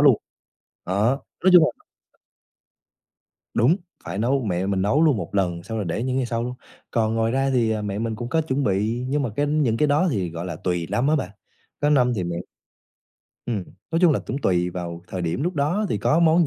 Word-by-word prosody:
luôn. - - +7 0.7
Đó, 100 +5 +2 0.4
nói 185 - +7
chung 175 -3 +9
là - - 0 1.8
Đúng, 120 +9 +4 0.3
phải 95 - -5
nấu 130 +4 +1
mẹ 90 -2 -1
mình 95 -1 0
nấu 135 +11 +3
luôn 150 -6 +4
1 100 - -5
lần 90 -3 0
xong 115 +3 -4
rồi 105 - -1
để 90 +7 -2
những 130 0 -1
ngày 130 -2 +1
sau 115 -1 -2
luôn. 125 +1 -3 0.4
Còn 110 -1 +1
ngoài 115 0 +1
ra 135 +1 +1
thì, 120 -4 +2
ờ, 110 -1 -1
mẹ 100 -1 -3
mình 110 0 -2
cũng 120 +2 -5
có 160 +4 +2
chuẩn 140 -2 -1
bị, 110 +5 0
nhưng 145 +2 +1
mà 125 - -1
cái 145 - +1
những 145 -6 +1
cái 150 - +3
đó 150 +6 +3
thì, 95 - -1
gọi 85 +2 -5
là, 85 -3 -4
tùy 90 -1 -2
năm 125 +4 +1
á 155 - +4
bạn, 100 -10 -2 0.5
có 145 0 +2
năm 125 -4 +4
thì 95 -5 -2
mẹ 85 0 -3 1.1
Ừm, 105 -6 -2 0.3
nói 165 - +1
chung 175 -4 +6
là - - +1
cũng 135 - -2
tùy 90 -8 +1
vào 85 -1 -6
thời 95 -2 -4
điểm 85 +9 -1
lúc 175 +3 -1
đó 160 +9 +1
thì - - -1
có 155 - +2
món 165 0 +5
115 Hz, 230 wpm, -23 LUFS, 95-145 Hz, 1.8 s, chung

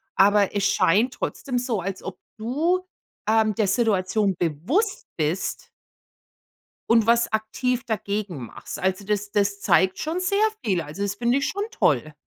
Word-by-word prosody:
Aber 205 0 +4
es 200 0 0
scheint 205 +6 +3
trotzdem 255 -2 -3
so, 240 -5 -1
als 190 +1 -5
ob 190 -1 -7 0.2
du, 320 +11 0 0.4
ähm, 220 -1 +3
der 210 -1 +1
Situation 200 -2 +1
bewusst 225 - -1
bist 160 +4 -2 1.2
und 230 -1 +4
was 235 -1 +3
aktiv 235 +4 -1
dagegen 205 - -3
machst. 200 - -8
Also, 190 +1 -1
das 210 0 -2
das 200 0 0
zeigt 190 -1 +3
schon 320 +3 -2
sehr 400 +4 +2 0.2
viel. 185 -6 +1
Also, 155 +6 -8
das 200 0 -2
finde 240 +4 +1
ich 280 - 0
schon 405 +1 -2
toll. 150 - +1
210 Hz, 150 wpm, -24 LUFS, 190-245 Hz, 1.2 s, Aber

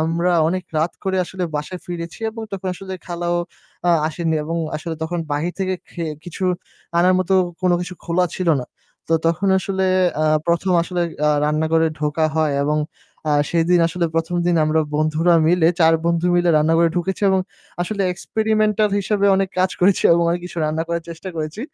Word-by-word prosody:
আমরা 170 +3 +1 0.2
অনেক 185 +1 -1 0.2
রাত 160 +3 0
করে 190 0 0
আসলে 185 +1 -4
বাসায় 175 +5 -5
ফিরেছি 170 +2 -6
এবং 225 0 -8
তখন 190 -1 -4
আসলে 190 +1 -8
খালাও 175 0 -2 0.5
আ - - +6 0.2
আসেনি 160 0 -1
এবং 165 +2 -3 0.2
আসলে 165 +1 -5
তখন 170 +2 -2
বাহির 160 +5 -1
থেকে 190 -1 0 0.2
খেয়ে 165 -3 -4
কিছু 175 +2 -5 0.5
আনার 185 +1 +4
মতো 185 +1 +1 0.3
কোনো 180 -1 +3
কিছু 180 +1 -5
খোলা 175 +2 +1
ছিল 185 -2 -1
না। 125 - -7 0.4
তো 165 - 0
তখন 170 +4 +1
আসলে 190 0 -1 0.4
আ - - +2 0.2
১ম 170 +2 +1
আসলে 180 +1 -3 0.3
আ - - +4 0.2
রান্না 155 +1 +1
ঘরে 165 0 +4
ঢোকা 150 +1 0
হয় 155 -2 +2
এবং 150 +1 +1 0.5
আ - - +3 0.2
সেদিন 170 +1 +3
আসলে 170 +1 -1
১ম 165 +2 -1
দিন 175 -1 +3
আমরা 155 +1 +2
বন্ধুরা 155 +3 +2
মিলে 165 -1 +4
৪ 165 0 +6
বন্ধু 170 +1 +1
মিলে 175 0 +2
রান্নাঘরে 165 +2 +3
ঢুকেছি 190 +3 -2
এবং 190 0 +3 0.4
আসলে 200 +2 -2
experimental 215 +1 +1
হিসেবে 200 0 +1
অনেক 195 -1 +1
কাজ 185 0 +3
করেছি 190 +1 +3
এবং 170 - +3
অনেক 175 +1 -1
কিছু 175 - -7
রান্না 155 +1 -1
করার 170 -1 -2
চেষ্টা 170 +3 -7
করেছি। 155 +6 -4
175 Hz, 180 wpm, -20 LUFS, 160-185 Hz, 0.5 s, আ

